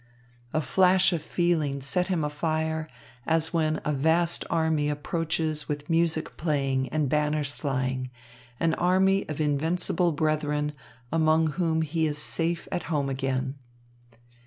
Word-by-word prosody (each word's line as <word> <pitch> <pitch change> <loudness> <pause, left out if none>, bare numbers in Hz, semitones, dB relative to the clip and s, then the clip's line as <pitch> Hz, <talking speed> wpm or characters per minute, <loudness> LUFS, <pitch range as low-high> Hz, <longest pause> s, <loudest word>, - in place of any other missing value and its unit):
A 155 - 0
flash 185 +6 +4
of 165 - -1
feeling 155 -4 0
set 140 +7 0
him 175 -5 0
afire, 160 +1 -2 0.4
as 160 0 +2
when 155 -2 +1
a 150 - +1
vast 165 +4 +2
army 160 -3 +1
approaches 155 +1 -2
with 145 +2 -4
music 165 -1 +1
playing 135 -4 0
and 155 -2 0
banners 150 0 0
flying, 130 -2 -2 0.5
an 165 -1 +2
army 190 +2 +2
of 150 - -4
invincible 165 +4 +1
brethren, 150 -1 0 0.4
among 160 0 +3
whom 160 -1 0
he 160 +1 0
is 150 -1 -2
safe 165 +2 0
at 175 - -1
home 145 -4 0
again. 135 0 -2
155 Hz, 135 wpm, -27 LUFS, 145-165 Hz, 0.5 s, flash